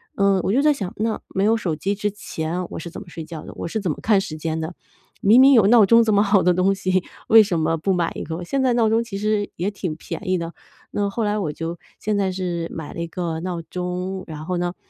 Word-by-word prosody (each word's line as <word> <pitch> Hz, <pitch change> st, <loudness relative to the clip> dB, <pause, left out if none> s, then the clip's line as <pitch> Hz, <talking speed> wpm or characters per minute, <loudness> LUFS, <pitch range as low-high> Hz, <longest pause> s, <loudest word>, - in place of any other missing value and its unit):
嗯， 195 Hz, -1 st, +3 dB
我 -, -, 0 dB
就 265 Hz, +6 st, +3 dB
在 300 Hz, 0 st, +5 dB
想， 195 Hz, -9 st, -5 dB
那 220 Hz, +1 st, -1 dB
没 190 Hz, -, -1 dB
有 220 Hz, +2 st, +4 dB
手 180 Hz, -8 st, -2 dB
机 195 Hz, +6 st, -1 dB
之 205 Hz, +1 st, -1 dB
前 180 Hz, -3 st, -4 dB
我 -, -, -5 dB
是 170 Hz, -, -7 dB
怎 -, -, -8 dB
么 -, -, -12 dB
睡 165 Hz, -1 st, -7 dB
觉 155 Hz, -1 st, -8 dB
的？ -, -, -10 dB
我 -, -, -5 dB
是 220 Hz, -, -2 dB
怎 185 Hz, -5 st, -1 dB
么 -, -, -5 dB
看 210 Hz, -2 st, +4 dB
时 195 Hz, -5 st, -5 dB
间 160 Hz, +1 st, -3 dB
的？ 160 Hz, +2 st, -4 dB, 0.5 s
明 220 Hz, +6 st, +6 dB
明 270 Hz, +1 st, +8 dB
有 225 Hz, -6 st, +6 dB
闹 230 Hz, 0 st, +7 dB
钟 230 Hz, +3 st, +6 dB
这 220 Hz, -1 st, +2 dB
么 200 Hz, -, +5 dB
好 200 Hz, -2 st, +3 dB
的 180 Hz, -, +4 dB
东 185 Hz, +2 st, +2 dB
西， 185 Hz, -1 st, 0 dB, 0.2 s
为 225 Hz, 0 st, +8 dB
什 190 Hz, -6 st, 0 dB
么 160 Hz, +1 st, +1 dB
不 165 Hz, +5 st, -1 dB
买 175 Hz, -3 st, +1 dB
一 -, -, -5 dB
个？ 165 Hz, +2 st, -5 dB
现 270 Hz, +10 st, -1 dB
在 255 Hz, -2 st, +3 dB
闹 235 Hz, -2 st, +3 dB
钟 225 Hz, +1 st, +2 dB
其 215 Hz, -4 st, -6 dB
实 210 Hz, 0 st, 0 dB
也 185 Hz, +4 st, -2 dB
挺 185 Hz, -6 st, -4 dB
便 185 Hz, +4 st, -6 dB
宜 185 Hz, -, +2 dB
的， 170 Hz, -1 st, -5 dB, 0.4 s
那 205 Hz, -1 st, 0 dB
后 225 Hz, +3 st, -2 dB
来 210 Hz, 0 st, 0 dB
我 165 Hz, -7 st, -2 dB
就 165 Hz, +2 st, -5 dB, 0.2 s
现 215 Hz, 0 st, -1 dB
在 190 Hz, -1 st, +1 dB
是 175 Hz, -3 st, -3 dB
买 160 Hz, -2 st, -7 dB
了 -, -, -7 dB
一 170 Hz, -, -2 dB
个 165 Hz, -1 st, -3 dB
闹 175 Hz, 0 st, -3 dB
钟， 180 Hz, +2 st, -4 dB
然 155 Hz, -1 st, -7 dB
后 180 Hz, +1 st, -2 dB
呢， 175 Hz, +1 st, -2 dB
185 Hz, 295 characters per minute, -22 LUFS, 170-210 Hz, 0.5 s, 明